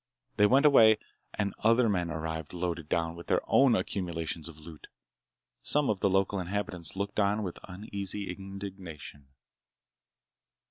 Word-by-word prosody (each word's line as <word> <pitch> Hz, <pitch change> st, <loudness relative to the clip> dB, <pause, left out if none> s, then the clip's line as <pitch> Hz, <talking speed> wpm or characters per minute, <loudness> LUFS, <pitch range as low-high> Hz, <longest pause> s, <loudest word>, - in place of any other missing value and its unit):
They 105 Hz, -, +6 dB
went 135 Hz, +6 st, +4 dB
away 110 Hz, -7 st, +7 dB, 0.4 s
and 100 Hz, -1 st, -1 dB
other 115 Hz, +2 st, +4 dB
men 90 Hz, -5 st, 0 dB
arrived 80 Hz, 0 st, -4 dB
loaded 85 Hz, -3 st, -3 dB
down 80 Hz, 0 st, 0 dB
with 85 Hz, -, -11 dB
their -, -, +2 dB
own 135 Hz, -4 st, +5 dB
accumulations 85 Hz, -5 st, -3 dB
of 80 Hz, -, -12 dB
loot. 80 Hz, 0 st, -12 dB, 0.7 s
Some 145 Hz, -4 st, +1 dB
of 100 Hz, -, -3 dB
the 100 Hz, -, +2 dB
local 95 Hz, +1 st, +1 dB
inhabitants 90 Hz, -2 st, -3 dB
looked 100 Hz, +2 st, -3 dB
on 105 Hz, +1 st, +2 dB
with 90 Hz, -3 st, -5 dB
uneasy 100 Hz, 0 st, -5 dB
indignation. 95 Hz, -7 st, -9 dB
95 Hz, 140 wpm, -29 LUFS, 85-105 Hz, 0.7 s, away